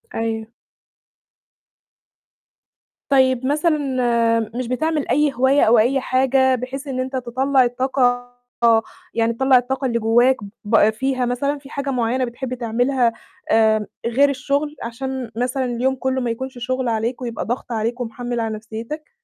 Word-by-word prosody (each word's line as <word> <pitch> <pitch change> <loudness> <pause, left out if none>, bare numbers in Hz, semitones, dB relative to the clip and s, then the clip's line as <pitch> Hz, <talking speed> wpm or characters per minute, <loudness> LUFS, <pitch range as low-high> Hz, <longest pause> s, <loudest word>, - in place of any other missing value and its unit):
أيوه. 225 -1 -2 2.6
طيب 260 -2 +3
مثلًا، 305 +3 +2 0.8
مش 250 -1 -3
بتعمل 305 +4 -1
أي 295 -1 +2
هواية 265 +3 +3
أو 225 0 +5
أي 265 +5 +3
حاجة 260 0 +2
بحيث 260 +3 -6
إن 255 -1 -3
أنت 260 +1 -3
تطلّع 260 +2 +2
الطاقة، 245 0 0 0.8
يعني 230 0 +1
تطلّع 265 +2 +4
الطاقة 265 +2 -1
اللي 235 -2 0
جواك، 240 +4 +4 0.3
ب 215 0 +4
فيها 255 +3 -1
مثلًا 280 +4 -1
فيه 275 0 -14
حاجة 280 -1 -4
معينة 250 +1 0
بتحب 250 +2 -5
تعملها، 245 +1 +1 0.4
آآ، 220 -2 +3 0.2
غير 270 +5 +3
الشُغل؟ 280 +3 -1
عشان 250 +1 -5
مثلًا 255 +2 -1
اليوم 250 +2 0
كله 260 0 -1
ما 240 - -1
يكونش 260 +2 -6
شُغل 255 +1 -2
عليك، 230 +3 -2
ويبقى 235 -2 -4
ضغط 240 +1 -4
عليك 230 +2 -2
ومحمِل 240 +1 -4
على 225 -1 -2
نفسيتك. 225 +8 -7
255 Hz, 140 wpm, -21 LUFS, 235-265 Hz, 2.6 s, أو